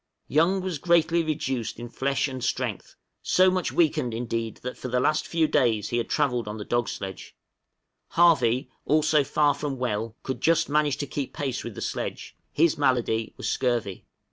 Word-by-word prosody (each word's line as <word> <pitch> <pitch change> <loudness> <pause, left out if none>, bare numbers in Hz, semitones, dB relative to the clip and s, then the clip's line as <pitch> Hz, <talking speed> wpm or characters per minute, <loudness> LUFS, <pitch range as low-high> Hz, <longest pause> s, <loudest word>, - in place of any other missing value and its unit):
Young 170 +6 +2
was 180 -5 -3
greatly 170 0 +3
reduced 135 -8 -2
in 120 - -6
flesh 135 +2 -1
and 130 -2 -6
strength, - - -3 0.3
so 185 0 +4
much 185 -1 -1
weakened 135 -8 +1
indeed 115 -1 -3
that 125 0 -4
for - - -6
the 125 0 0
last 155 +4 +1
few 165 -2 +2
days 115 -8 +1
he 120 - -1
had 120 - -2
travelled 125 -7 0
on 105 +1 -5
the 105 - -6
dog 120 -3 0
sledge; 95 -1 -7 0.7
Harvey 130 -7 +3
also 155 0 +3
far 145 +1 +2
from 140 -1 -4
well 115 -2 -2
could 130 -2 -4
just 165 0 +3
manage 150 -1 +2
to 145 - -3
keep 140 -1 -4
pace 135 -4 -3
with 120 -3 -7
the - - -7
sledge; - - -4 0.2
his 160 -1 +2
malady 120 -5 +1
was - - -4
scurvy. 120 -7 -1
130 Hz, 180 wpm, -26 LUFS, 120-155 Hz, 0.7 s, so